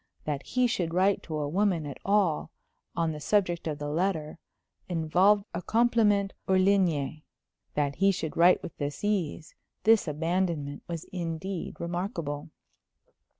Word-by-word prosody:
That 145 -2 -2
he 250 0 +1
should 175 -8 -1
write 190 +2 +3
to 155 -2 -5
a 150 -1 -1
woman 180 -1 +1
at 140 -2 -7
all, 195 -6 +2 0.5
on 165 -2 +1
the 150 - -6
subjects 175 -1 +1
of 150 -2 -2
the 145 0 -4
letter, 160 0 -1 0.5
involved 180 +5 +3
a 170 - -3
compliment 215 -2 +2
hors 190 0 +4
ligne; 170 -7 +2 0.5
that 145 -1 0
he 195 0 +4
should 160 -4 -4
write 175 +2 +5
with - - -7
this 145 +4 -4
ease, 185 -7 -1 0.3
this 225 -4 +5
abandonment, 160 -2 -1
was 165 -2 -4
indeed 175 +1 -4
remarkable. 170 -4 -3
170 Hz, 145 wpm, -28 LUFS, 155-195 Hz, 0.5 s, write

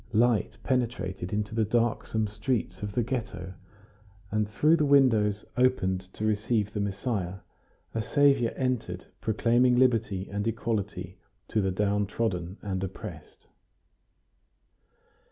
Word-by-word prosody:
Light 115 0 +2
penetrated 105 -8 -1
into 105 0 -2
the 110 0 +2
darksome 110 0 0
streets 105 -3 -2
of 105 -1 -4
the 120 - +1
Ghetto, 110 -7 -4 0.8
and 105 0 0
through 155 +9 +4
the 150 - +2
windows 115 -8 +4
opened 95 -7 +1
to 110 - -3
receive 110 0 0
the 105 - -2
Messiah, 100 -2 -2 0.5
a 115 - 0
saviour 140 -1 +3
entered 120 -9 -2 0.2
proclaiming 120 +3 +3
liberty 110 -7 +2
and 100 +2 -3
equality 105 -5 -3 0.3
to 110 - +1
the 95 - +1
downtrodden 100 -1 -1
and 95 -2 -2
oppressed. 95 0 -8
105 Hz, 120 wpm, -28 LUFS, 95-120 Hz, 0.8 s, through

